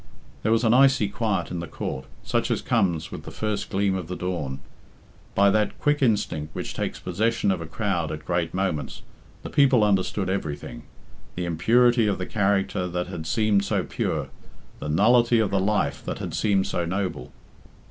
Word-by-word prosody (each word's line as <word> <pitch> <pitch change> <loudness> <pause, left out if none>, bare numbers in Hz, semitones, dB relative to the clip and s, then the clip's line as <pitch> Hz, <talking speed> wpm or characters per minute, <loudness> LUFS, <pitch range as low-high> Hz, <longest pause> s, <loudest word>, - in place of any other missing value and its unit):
There 110 - +1
was 115 +1 +3
an 115 -1 +4
icy 135 -4 +5
quiet 105 -2 -1
in 90 - -3
the 85 - -5
court, 65 -2 -5 0.2
such - - 0
as - - -1
comes 85 -4 0
with - - -6
the - - -9
first 105 -2 -3
gleam 100 0 +1
of 90 -3 -3
the 90 - -4
dawn. 85 -8 -3 0.8
By 100 0 +5
that 105 0 +1
quick 145 0 +1
instinct 100 - 0
which - - -4
takes - - -3
possession 110 +4 0
of 90 -3 -2
a 85 - -6
crowd 85 -2 -1
at 75 - -6
great 85 -2 0
moments, 95 -5 -2 0.4
the - - -7
people 130 -5 +4
understood 95 -1 +1
everything 80 -6 -4 0.5
the 90 - -2
impurity 115 +7 +3
of 100 - +1
the 90 - -3
character 95 -3 0
that 90 0 -3
had 80 -1 -6
seemed 105 -1 +2
so 100 - 0
pure, - - -2 0.5
the 75 - -5
nullity 120 +8 +4
of 110 -3 +1
the 100 - +2
life 95 -8 0
that - - -3
had - - -5
seemed 100 -3 +2
so 85 - -1
noble. 90 -7 -3
95 Hz, 185 wpm, -25 LUFS, 85-110 Hz, 0.8 s, icy